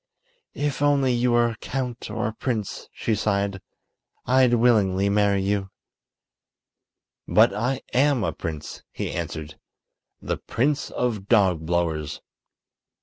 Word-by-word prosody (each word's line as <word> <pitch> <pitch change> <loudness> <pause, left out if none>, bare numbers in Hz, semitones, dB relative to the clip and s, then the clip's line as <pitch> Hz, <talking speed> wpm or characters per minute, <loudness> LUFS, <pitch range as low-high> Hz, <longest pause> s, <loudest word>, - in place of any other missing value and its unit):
"If 145 -1 -2
only 140 -3 +3
you 120 0 +2
were 120 0 +4
a 115 - -7
count 125 -2 -4
or 110 +2 -2
a - - -8
prince," 110 -3 -4
she 115 - -2
sighed, 100 -2 0 0.6
"I'd 125 -1 +4
willingly 100 -5 +3
marry 100 -1 +2
you." 100 0 -1 1.6
"But - - +5
I 125 +5 -1
am 135 -2 +3
a - - -1
prince," 75 -2 -6
he - - -4
answered; 75 -1 -5 0.6
"the - - -3
Prince 140 +4 -1
of 110 -6 -2
Dogblowers." 85 -7 +1
110 Hz, 120 wpm, -24 LUFS, 95-125 Hz, 1.6 s, But